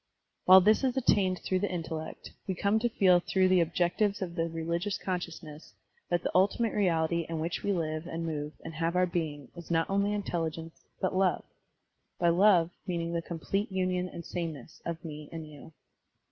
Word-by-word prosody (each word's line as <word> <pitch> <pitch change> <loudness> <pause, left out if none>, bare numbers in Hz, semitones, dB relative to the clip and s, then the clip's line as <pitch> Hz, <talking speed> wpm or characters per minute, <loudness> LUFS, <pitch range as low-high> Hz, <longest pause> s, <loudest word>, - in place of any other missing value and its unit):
While 190 +1 +9
this 215 +7 +4
is 260 -1 +1
attained 190 -7 +2
through 185 - 0
the 205 - -1
intellect, 160 -2 -5 0.2
we 190 - -1
come 200 +4 +2
to 240 +2 +1
feel 185 -5 +4
through 185 +1 +2
the 185 -1 +5
objectives 175 +5 +1
of 180 -3 -4
the 165 -1 -1
reli 165 +1 -2
gious 200 +1 -2
consciousness 170 -4 -6 0.3
that 175 0 +1
the - - -1
ultimate 205 +5 +2
reality 170 -4 +1
in, 165 - -2
which 165 +2 -2
we 200 - 0
live 160 -2 -2
and 165 -1 -4
move 150 -2 -3
and 165 - -6
have 165 +2 -1
our 180 0 +4
being 155 -6 -3
is 170 -2 -10
not 165 -1 +2
only 200 +1 +2
intelligence 165 -5 -4 0.2
but 185 - -1
love 185 -3 +2 0.4
— - - -50
^by 170 -1 +3
love 180 -3 +5 0.2
meaning 170 -2 -2
the 170 - 0
complete 195 +5 -3
tmion 185 -1 -1
and 170 - -8
sameness 160 -7 -6
of 170 0 -5
me 150 -1 -7
and 165 -1 -6
you. 150 +1 -12
175 Hz, 190 wpm, -30 LUFS, 165-190 Hz, 0.4 s, While